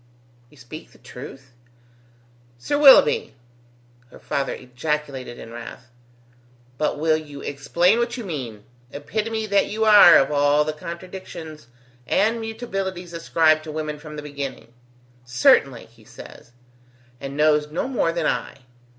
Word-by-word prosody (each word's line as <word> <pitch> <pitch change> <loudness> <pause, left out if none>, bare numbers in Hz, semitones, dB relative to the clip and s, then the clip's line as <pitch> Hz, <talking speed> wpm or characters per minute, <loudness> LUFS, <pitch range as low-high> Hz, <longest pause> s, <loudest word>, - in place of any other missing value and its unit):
"You 150 - -22
speak 135 +6 -12
the - - -19
truth?" 130 0 -12 1.0
"'Sir 125 - -3
Willoughby!'" 460 - +6 0.7
her - - -15
father 140 - -3
ejaculated 130 -1 -5
in 115 - -11
wrath. 120 +1 -10 0.9
"But 150 - -1
will 155 +1 +2
you 145 -3 -10
explain 170 +9 +1
what 240 +1 -2
you 240 - -6
mean, 125 - -6 0.3
epitome 220 +9 -3
that 200 -1 +2
you 220 +1 -1
are 205 -6 +8
of 135 - +2
all 145 +1 +3
the 155 0 -3
contradictions 170 -3 -9 0.4
and 225 +3 +1
mutabilities 195 -6 -5
ascribed 160 -2 +2
to 155 - -7
women 150 -1 -5
from 150 0 -10
the 150 - -7
beginning! 140 -4 -7 0.5
'Certainly', 125 0 +2
he 115 0 -23
says, 115 - -14 0.7
and 140 +1 -7
knows 150 0 +2
no 160 +10 -3
more 245 -10 0
than 165 -2 -3
I. 140 - -3
155 Hz, 135 wpm, -22 LUFS, 140-190 Hz, 1.0 s, are